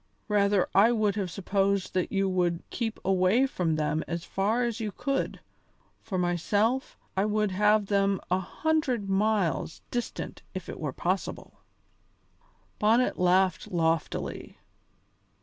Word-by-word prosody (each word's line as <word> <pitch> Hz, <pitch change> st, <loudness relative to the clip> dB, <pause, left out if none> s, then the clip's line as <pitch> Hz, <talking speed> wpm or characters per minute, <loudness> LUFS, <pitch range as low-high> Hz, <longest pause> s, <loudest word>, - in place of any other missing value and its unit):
"Rather 200 Hz, -2 st, +3 dB
I 205 Hz, +5 st, +6 dB
would 215 Hz, -3 st, +2 dB
have 195 Hz, -4 st, -2 dB
supposed 195 Hz, +2 st, 0 dB
that 185 Hz, -1 st, 0 dB
you 195 Hz, 0 st, +1 dB
would 175 Hz, -2 st, 0 dB
keep 225 Hz, -3 st, -3 dB
away 190 Hz, +7 st, +3 dB
from 175 Hz, -11 st, -1 dB
them 155 Hz, 0 st, 0 dB
as 170 Hz, -1 st, -3 dB
far 215 Hz, +5 st, 0 dB
as 235 Hz, -1 st, -2 dB
you 215 Hz, -2 st, -3 dB
could. 275 Hz, +6 st, -2 dB, 0.6 s
For 190 Hz, -, -4 dB
myself, 200 Hz, -, 0 dB, 0.2 s
I 190 Hz, -, +2 dB
would 210 Hz, -1 st, +1 dB
have 210 Hz, +2 st, +3 dB
them 195 Hz, -1 st, +1 dB
a 185 Hz, -, +3 dB
hundred 250 Hz, -, -1 dB
miles 195 Hz, -6 st, 0 dB
distant 240 Hz, -1 st, -4 dB
if 185 Hz, -, -5 dB
it -, -, -7 dB
were 150 Hz, -3 st, -2 dB
possible." 180 Hz, +7 st, -3 dB, 1.2 s
Bonnet 225 Hz, +4 st, +3 dB
laughed 180 Hz, 0 st, +3 dB
loftily. 165 Hz, -2 st, -2 dB
195 Hz, 130 wpm, -28 LUFS, 180-215 Hz, 1.2 s, I